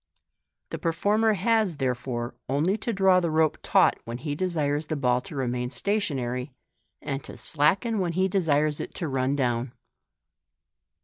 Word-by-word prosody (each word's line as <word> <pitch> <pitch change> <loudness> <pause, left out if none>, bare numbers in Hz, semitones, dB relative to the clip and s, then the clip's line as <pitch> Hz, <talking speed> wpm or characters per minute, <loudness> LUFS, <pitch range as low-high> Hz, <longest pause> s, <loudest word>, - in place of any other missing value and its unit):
The - - -4
performer 205 +6 +2
has, 210 -2 +1
therefore, 125 -3 -2 0.2
only 150 +9 +1
to 235 - -3
draw 190 -3 +4
the 170 -2 -1
rope 155 0 +2
taut - - +3
when 115 +1 -5
he 145 +2 -4
desires 150 -3 -1
the 155 - -2
bill 125 -3 +1
to 150 - -10
remain 125 -2 -2
s'at - - -7 0.3
onary, 125 -1 -3 0.5
and 135 -2 -3
to - - -10
slacken 190 +9 +2
when 175 -3 -1
he 185 +2 +2
desires 155 -6 +1
it - - -6
to 170 - -2
run 135 0 0
down. 125 -2 -1
150 Hz, 160 wpm, -26 LUFS, 130-185 Hz, 0.5 s, draw